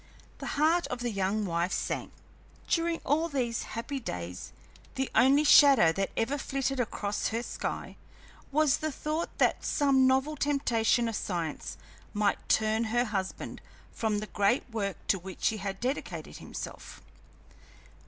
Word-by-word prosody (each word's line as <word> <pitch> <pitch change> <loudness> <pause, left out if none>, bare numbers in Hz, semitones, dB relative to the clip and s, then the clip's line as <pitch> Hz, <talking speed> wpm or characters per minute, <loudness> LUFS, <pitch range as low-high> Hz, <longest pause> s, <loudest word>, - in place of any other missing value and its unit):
The - - -5
heart 325 +4 +3
of 250 -1 -5
the 240 -1 -1
young 200 +1 0
wife 170 0 0
sank. - - -2 0.6
During 335 0 +1
all 320 +4 +2
these 245 -5 -1 0.2
happy 275 +4 -3
days 90 - -6 0.4
the 265 0 -2
only 275 +4 +5
shadow 275 - +7
that 195 +3 -1
ever 265 +6 0
flitted 270 0 -2
across 205 -3 -1
her 230 +2 -2
sky - - -5 0.5
was 300 -1 +3
the 310 0 -2
thought 305 +4 -2
that - - +2
some 270 -3 +3
novel 265 +4 +2
temptation 240 -5 +2
of 225 - -2
science 170 -7 -3 0.4
might 205 -1 0
turn 220 +1 +2
her 240 +2 +1
husband 195 -4 -4 0.3
from 220 -2 -1
the 210 - -3
great 205 +4 +1
work 200 -5 -2
to 195 - +2
which 185 +1 -1
he 220 - -3
had 195 -1 -4
dedicated 260 +4 -4
himself. - - -8
235 Hz, 145 wpm, -29 LUFS, 200-280 Hz, 0.6 s, shadow